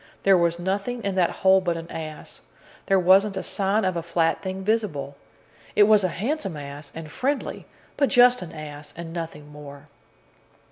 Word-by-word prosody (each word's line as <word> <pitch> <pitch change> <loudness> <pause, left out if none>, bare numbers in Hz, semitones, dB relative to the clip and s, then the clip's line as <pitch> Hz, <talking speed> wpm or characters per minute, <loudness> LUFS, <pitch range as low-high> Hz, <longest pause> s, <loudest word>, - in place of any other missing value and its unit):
There 195 -1 +6
was 170 -1 +2
nothing 200 +7 -3
in 200 - -1
that 180 -2 +2
hole 190 0 +3
but 175 -2 -1
an 165 0 -7
ass. 155 -1 -8 0.5
There 195 -1 +4
wasn't 195 +2 +4
a - - -3
sign 200 +2 0
of 185 -1 0
a 170 - -1
flat 165 0 0
thing 190 0 -5
visible. 185 -11 -1 0.6
It 210 - +7
was 210 -1 +5
a - - +3
handsome 200 - -3
ass, 145 0 -9
and 160 -2 -8
friendly, 275 - -3 0.3
but 280 - +2
just 245 -2 +5
an 175 - -7
ass, 150 -1 -9
and 165 -1 -7
nothing 155 -3 -7
more." 145 0 -12
180 Hz, 180 wpm, -24 LUFS, 155-200 Hz, 0.6 s, It